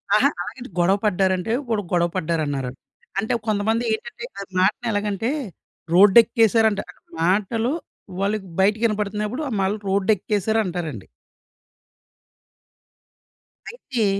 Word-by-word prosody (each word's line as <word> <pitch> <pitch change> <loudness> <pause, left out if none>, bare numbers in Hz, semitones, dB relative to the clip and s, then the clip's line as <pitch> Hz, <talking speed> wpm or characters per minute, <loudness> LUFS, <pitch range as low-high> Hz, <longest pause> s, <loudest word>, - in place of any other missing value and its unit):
అహ! 255 +6 +5
అలాగని 250 +7 -7
గొడవ 185 +3 +4
పడ్డారంటే, 190 +1 +1 0.2
వాడు 220 -2 +1
గొడవ 175 -1 +2
పడ్డారన్నారా? 155 -7 -1 0.5
అంటే 220 +5 -1
కొంతమంది 220 +2 +1
ఏంటంటే 220 - -6
ఆ - - -4 0.2
మాటని 205 +5 +1
ఎలాగంటే 205 +2 -1 0.6
రోడ్డేక్కేసారంట 220 +2 +5 0.4
మాటలు 210 +7 +1 0.5
వాళ్ళకి 200 -1 -1
బయటకి 210 +4 +3
వినపడుతున్నప్పుడు 210 +3 -1
ఆ - - -6
మళ్ళ 190 +2 +1
రోడ్డేక్కేసారు 205 +2 +1
అంటారండి. 175 -3 -5 2.6
అయితే 265 - -2
205 Hz, 95 wpm, -22 LUFS, 185-225 Hz, 2.6 s, అహ